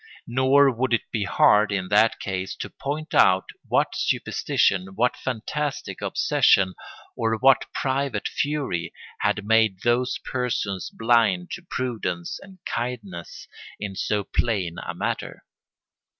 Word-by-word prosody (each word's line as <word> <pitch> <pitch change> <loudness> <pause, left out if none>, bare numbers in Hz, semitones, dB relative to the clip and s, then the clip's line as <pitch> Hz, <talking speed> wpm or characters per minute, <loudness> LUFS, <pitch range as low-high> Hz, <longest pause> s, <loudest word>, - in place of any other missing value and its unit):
Nor 130 +3 +4
would 125 0 +2
it - - -6
be 105 -3 -1
hard, 105 +2 +4
in 95 -2 -2
that 105 +2 +4
case, 95 -1 -4
to - - -7
point 155 +3 -5
out 95 0 +5 0.2
what - - +1
superstition, 95 0 0
what 120 +4 +2
fantastic 135 +4 -4
obsession, 95 -1 +3 0.4
or 115 0 0
what 135 +3 +5
private 135 +1 -1
fury, 140 - -2 0.2
had 105 - 0
made 110 -3 +3
those 125 +1 +1
persons 115 -7 -2
blind 115 -6 +2
to - - -5
prudence 115 - -3
and 195 -1 -14
kindness 110 -8 -5 0.3
in 100 -2 -5
so 105 +1 -1
plain 95 -7 -1
a - - -5
matter. - - -4
115 Hz, 125 wpm, -24 LUFS, 95-130 Hz, 0.4 s, out